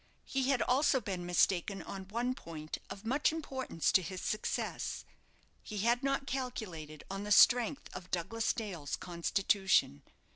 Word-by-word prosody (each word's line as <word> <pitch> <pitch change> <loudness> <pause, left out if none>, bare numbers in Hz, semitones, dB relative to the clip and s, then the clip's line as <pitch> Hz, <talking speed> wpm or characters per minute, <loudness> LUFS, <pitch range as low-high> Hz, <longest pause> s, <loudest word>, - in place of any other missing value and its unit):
He 270 0 0
had 270 -3 +3
also 265 +1 +3
been 190 -6 -4
mistaken 185 +2 +2
on 190 -1 -7
one 240 +5 -1
point 155 -8 -7
of 200 +2 -8
much 270 +7 +2
importance 265 - -1
to 190 - +5
his 185 +1 -5
success; 215 - -2 0.6
he 210 - -7
had 235 +3 +3
not 275 0 0
calculated 210 - -5
on 195 +1 -4
the 210 - -5
strength 245 +6 +5
of 180 - -8
Douglas 220 +6 0
Dale's 185 - -4
constitution. 185 - +1
205 Hz, 145 wpm, -33 LUFS, 180-250 Hz, 0.6 s, to